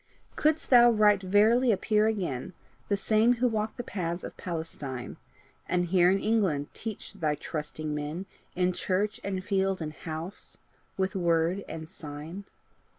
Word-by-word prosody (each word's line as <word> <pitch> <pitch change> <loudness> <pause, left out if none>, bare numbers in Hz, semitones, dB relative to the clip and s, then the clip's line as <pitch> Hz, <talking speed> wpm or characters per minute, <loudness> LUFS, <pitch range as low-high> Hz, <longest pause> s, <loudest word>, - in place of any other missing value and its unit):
Couldst 310 -1 +1
thou 240 -1 +9
right 210 -3 +4
verily 220 +6 +4
appear 215 +1 +2
again, 185 - -2 0.4
The 200 - +2
same 220 +4 +3
who 250 +1 +1
walked 215 -2 -2
the 245 - -4
paths 175 -5 -3
of - - -7
Palestine, 150 -7 -5 0.5
And 180 -1 +2
here 180 -1 +5
in 195 - +3
England 195 -10 +1
teach 220 -2 -6
thy 155 -7 0
trusting 150 0 -5
men, 150 +5 -4 0.3
In 180 0 +2
church 205 +5 -1
and 190 -2 -3
field 195 0 +1
and 155 -2 -4
house, 160 +5 -7 0.4
with 190 0 -1
word 170 +1 +1
and 160 -1 -6
sign? 160 +4 -8
190 Hz, 150 wpm, -28 LUFS, 160-215 Hz, 0.5 s, thou